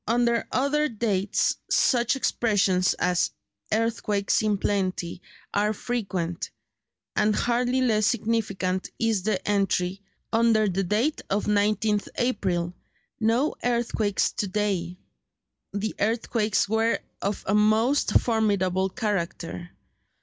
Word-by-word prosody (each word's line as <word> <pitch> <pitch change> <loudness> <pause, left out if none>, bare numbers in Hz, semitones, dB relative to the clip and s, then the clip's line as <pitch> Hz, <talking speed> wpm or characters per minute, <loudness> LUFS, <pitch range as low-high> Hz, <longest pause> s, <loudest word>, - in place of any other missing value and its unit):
Under 235 0 +2
other 295 +3 +1
dates 205 -4 0
such 240 0 +3
expressions 200 -8 +2
as 180 -1 +1 0.4
"Earthquakes 215 -2 +1
in 210 -2 +1
plenty" 185 -3 -2 0.3
are 210 +1 +2
frequent; 190 -8 -3 0.7
and 210 0 +2
hardly 245 +2 +1
less 215 -4 +2
significant 200 -5 -1
is 225 -4 +1
the 190 -1 -2
entry, 195 -2 0 0.3
under 225 -1 +4
the 195 0 0
date 215 - 0
of 200 +2 0
19th 210 0 +1
April, 185 -8 0 0.5
"No 235 +6 +2
earthquakes 235 -4 +1
to 205 - -2
day." 185 -3 -1 0.8
The 205 +2 -2
earthquakes 220 -1 +1
were 225 +2 +2 0.2
of 200 +1 -2
a 195 - 0
most 220 +6 +3
formidable 195 -5 +1
character. 180 -4 -3
210 Hz, 105 wpm, -26 LUFS, 195-230 Hz, 0.8 s, under